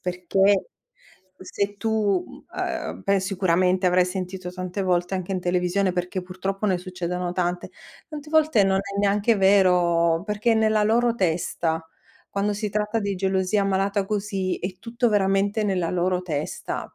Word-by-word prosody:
perché 190 Hz, -, +1 dB, 0.7 s
se 200 Hz, +2 st, -3 dB
tu, 220 Hz, -, 0 dB
mhmm, -, -, -14 dB, 0.2 s
ehm, -, -, -4 dB
pen 195 Hz, -1 st, +2 dB
sicuramente 185 Hz, -1 st, +1 dB
avrai 180 Hz, 0 st, +4 dB
sentito 185 Hz, 0 st, -5 dB
tante 185 Hz, +2 st, -4 dB
volte 180 Hz, 0 st, 0 dB
anche 185 Hz, 0 st, -3 dB
in 185 Hz, -, -1 dB
televisione, 180 Hz, +1 st, +1 dB
perché 180 Hz, +1 st, -2 dB
purtroppo 190 Hz, +3 st, -4 dB
ne 185 Hz, -3 st, +1 dB
succedono 180 Hz, -1 st, -4 dB
tante. 180 Hz, -1 st, -2 dB, 0.4 s
Tante 300 Hz, -1 st, -8 dB
volte 310 Hz, -9 st, +4 dB
non 195 Hz, 0 st, +2 dB
è 200 Hz, 0 st, -4 dB
neanche 205 Hz, +3 st, +2 dB
vero, 180 Hz, -4 st, +3 dB
perché 210 Hz, +2 st, +1 dB
è -, -, +3 dB
nella 220 Hz, -1 st, +3 dB
loro 230 Hz, +2 st, +2 dB
testa. 165 Hz, -4 st, -1 dB, 0.4 s
Quando 200 Hz, +1 st, -1 dB
si 210 Hz, +1 st, -3 dB
tratta 210 Hz, +2 st, -1 dB
di 200 Hz, -1 st, -2 dB
gelosia 190 Hz, +2 st, +1 dB
malata 195 Hz, +1 st, 0 dB
così 195 Hz, -2 st, -2 dB
è 185 Hz, 0 st, -5 dB
tutto 235 Hz, +3 st, -1 dB
veramente 200 Hz, +1 st, +1 dB
nella 185 Hz, -4 st, 0 dB
loro 180 Hz, 0 st, 0 dB
testa. 155 Hz, -4 st, -4 dB
190 Hz, 150 wpm, -24 LUFS, 180-205 Hz, 0.7 s, avrai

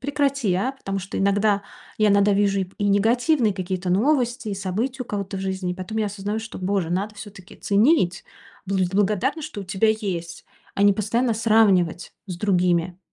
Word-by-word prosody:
прекрати, 275 Hz, -6 st, 0 dB
а". 250 Hz, +9 st, 0 dB
Потому 195 Hz, -7 st, -5 dB
что 190 Hz, +1 st, -6 dB
иногда, 200 Hz, +1 st, +2 dB, 0.3 s
я 215 Hz, -1 st, +3 dB
иногда 200 Hz, 0 st, +4 dB
вижу 200 Hz, 0 st, +2 dB
и -, -, 0 dB
п 185 Hz, -, -19 dB
негативные 225 Hz, +3 st, +2 dB
какие-то 185 Hz, -1 st, -3 dB
новости, 240 Hz, +3 st, +1 dB
и 200 Hz, -, -2 dB
события 225 Hz, +8 st, -3 dB
у -, -, -10 dB
кого-то 200 Hz, -1 st, -4 dB
в -, -, -4 dB
жизни. 190 Hz, -1 st, -3 dB
И -, -, -6 dB
потом 190 Hz, +4 st, -5 dB
я 215 Hz, -, +1 dB
осознаю, 205 Hz, +1 st, -4 dB
что, 225 Hz, -, -8 dB
Боже, 185 Hz, -2 st, -1 dB
надо 200 Hz, +4 st, -2 dB
всё-таки 200 Hz, -3 st, -11 dB
ценить, 205 Hz, -, +2 dB, 0.4 s
быть 190 Hz, -1 st, 0 dB
благодарным, 210 Hz, -, +1 dB
что 290 Hz, -9 st, -6 dB
у -, -, -10 dB
тебя 195 Hz, +4 st, +1 dB
есть, 175 Hz, -6 st, -4 dB, 0.3 s
а 200 Hz, -, 0 dB
не 205 Hz, 0 st, +6 dB
постоянно 230 Hz, +4 st, 0 dB
сравнивать 205 Hz, -6 st, +2 dB
с 180 Hz, -3 st, -5 dB
другими. 180 Hz, -2 st, +1 dB
200 Hz, 185 wpm, -23 LUFS, 190-225 Hz, 0.4 s, не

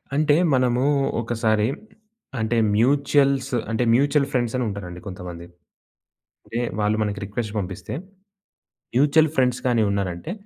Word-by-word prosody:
అంటే, 150 Hz, 0 st, +3 dB, 0.2 s
మనము 125 Hz, -1 st, +2 dB, 0.4 s
ఒకసారి 110 Hz, -2 st, +1 dB, 0.7 s
అంటే, 110 Hz, +1 st, 0 dB, 0.2 s
మ్యూచుయల్స్ 135 Hz, +2 st, +2 dB, 0.2 s
అంటే, 115 Hz, +2 st, 0 dB
మ్యూచువల్ 140 Hz, +2 st, +3 dB
ఫ్రండ్సని 125 Hz, -1 st, 0 dB
ఉంటారండి 90 Hz, -3 st, -7 dB
కొంతమంది. 90 Hz, -2 st, -8 dB, 1.0 s
అంటే, 115 Hz, -, -4 dB, 0.2 s
వాళ్ళు 105 Hz, +1 st, +1 dB
మనకి 105 Hz, -1 st, -3 dB
రిక్వెస్ట్ 105 Hz, +1 st, -4 dB
పంపిస్తే, 95 Hz, -1 st, -6 dB, 1.0 s
మ్యూచువల్ 150 Hz, +3 st, +4 dB
ఫ్రండ్స్ 130 Hz, -1 st, +2 dB
గాని 120 Hz, -3 st, +3 dB
ఉన్నారాంటే, 100 Hz, -, -3 dB
120 Hz, 110 wpm, -23 LUFS, 105-135 Hz, 1.0 s, మ్యూచువల్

